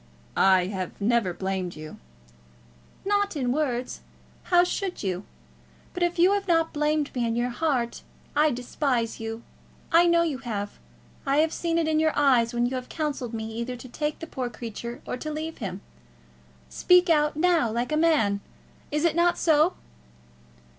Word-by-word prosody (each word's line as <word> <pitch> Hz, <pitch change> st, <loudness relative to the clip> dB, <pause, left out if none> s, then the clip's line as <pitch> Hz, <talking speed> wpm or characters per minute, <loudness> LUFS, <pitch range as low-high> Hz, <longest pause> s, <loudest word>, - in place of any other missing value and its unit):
"I 190 Hz, -2 st, +5 dB
have 185 Hz, -2 st, -5 dB
never 220 Hz, -2 st, +2 dB
blamed 190 Hz, 0 st, -3 dB
you." 155 Hz, 0 st, -9 dB, 1.1 s
"Not 405 Hz, -2 st, +1 dB
in 255 Hz, -4 st, 0 dB
words. 255 Hz, -3 st, -1 dB, 0.5 s
How 350 Hz, -1 st, +5 dB
should 365 Hz, -, -3 dB
you? 185 Hz, 0 st, -2 dB, 0.7 s
But 360 Hz, -, -5 dB
if 350 Hz, 0 st, +1 dB
you 360 Hz, +3 st, +5 dB
have 400 Hz, -1 st, -1 dB
not 330 Hz, -2 st, +2 dB
blamed 300 Hz, 0 st, 0 dB
me 245 Hz, -, -1 dB
in 230 Hz, -1 st, 0 dB
your 240 Hz, +1 st, 0 dB
heart, 250 Hz, -4 st, -1 dB, 0.3 s
I 305 Hz, +1 st, +4 dB
despise 245 Hz, -2 st, -1 dB
you. 225 Hz, +1 st, -5 dB, 0.5 s
I 340 Hz, +1 st, +6 dB
know 340 Hz, 0 st, +4 dB
you 300 Hz, -6 st, -2 dB
have. 210 Hz, -5 st, -5 dB, 0.4 s
I 275 Hz, +1 st, +1 dB
have 315 Hz, +1 st, +3 dB
seen 335 Hz, -1 st, -1 dB
it 330 Hz, -1 st, +1 dB
in 310 Hz, 0 st, +2 dB
your 315 Hz, 0 st, +2 dB
eyes 250 Hz, -5 st, +4 dB
when 240 Hz, 0 st, +1 dB
you 245 Hz, -, -2 dB
have 250 Hz, -, -7 dB
counselled 285 Hz, -7 st, -3 dB
me, 220 Hz, 0 st, -5 dB
either 235 Hz, +2 st, -4 dB
to 245 Hz, +1 st, -10 dB
take 300 Hz, +4 st, -3 dB
the -, -, -7 dB
poor 260 Hz, -6 st, -4 dB
creature 235 Hz, +1 st, -7 dB
or -, -, -4 dB
to 310 Hz, +4 st, -5 dB
leave 315 Hz, +1 st, -5 dB
him. 195 Hz, -3 st, -5 dB, 0.9 s
Speak 360 Hz, -, +4 dB
out, 300 Hz, -2 st, +3 dB
now, 330 Hz, -5 st, +3 dB
like 240 Hz, +5 st, -2 dB
a -, -, +2 dB
man. 295 Hz, -12 st, +2 dB, 0.5 s
Is 300 Hz, +3 st, 0 dB
it 325 Hz, -2 st, +2 dB
not 345 Hz, 0 st, +3 dB
so?" 315 Hz, +2 st, +3 dB
275 Hz, 175 wpm, -26 LUFS, 230-325 Hz, 1.1 s, I